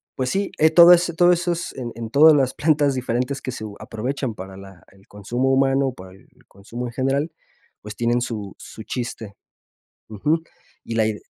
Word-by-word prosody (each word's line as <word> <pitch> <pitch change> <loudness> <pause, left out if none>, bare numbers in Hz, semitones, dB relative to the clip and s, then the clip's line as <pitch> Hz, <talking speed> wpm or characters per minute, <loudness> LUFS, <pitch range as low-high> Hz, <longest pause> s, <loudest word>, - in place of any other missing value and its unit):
pues 130 -1 -2
sí, 195 +5 -1
eh, 155 - +6
todas 175 +1 +7
todos 175 -1 +4
esos, 175 0 -3
en 120 -3 -6
en, 115 -1 -6
todas 155 +3 +7
las 135 -2 +1
plantas 150 -2 +2
diferentes 130 +2 -2
que 130 - -5
se 110 -3 -7
u 105 -1 -9
aprovechan 115 +3 -4
para 95 -1 -9
la 95 -3 -14
el 95 0 -23
consumo 120 +6 -2
humano, 135 0 +2
para 95 -6 -13
el 95 - -20 0.2
consumo 115 +5 -8
en 120 - -9
general, 135 +5 -1 0.5
pues, 105 0 -9
tienen 120 +1 0
su 105 -5 -5
su 110 - -11
chiste. 115 -3 -6 0.8
Ujú. 150 +10 0 0.4
Y 115 - -5
la 110 -1 +2
ide 110 -1 -3
125 Hz, 185 wpm, -22 LUFS, 110-145 Hz, 0.8 s, todas